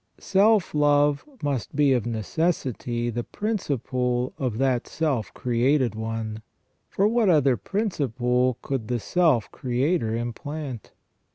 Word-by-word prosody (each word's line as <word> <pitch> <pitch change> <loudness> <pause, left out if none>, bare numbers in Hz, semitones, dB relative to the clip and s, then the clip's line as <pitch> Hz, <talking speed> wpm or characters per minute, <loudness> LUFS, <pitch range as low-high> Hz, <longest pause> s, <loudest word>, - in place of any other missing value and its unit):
Self 200 -1 +3
love 145 -1 +3 0.2
must 140 -6 -2
be 145 -2 +4
of 120 -2 0
necessity 120 - -1
the 120 +1 -3
principle 130 - -2
of 125 -5 -1
that 130 -1 +1
self 140 - -1
created 125 0 +1
one, 110 0 -4 0.5
for 200 - +2
what 225 -2 +2
other 140 -6 +4
principle 130 - 0
could 130 -6 -3
the 120 0 -1
self 155 - +2
creator 125 -1 0
implant? 125 +2 -5
130 Hz, 115 wpm, -25 LUFS, 120-150 Hz, 0.5 s, be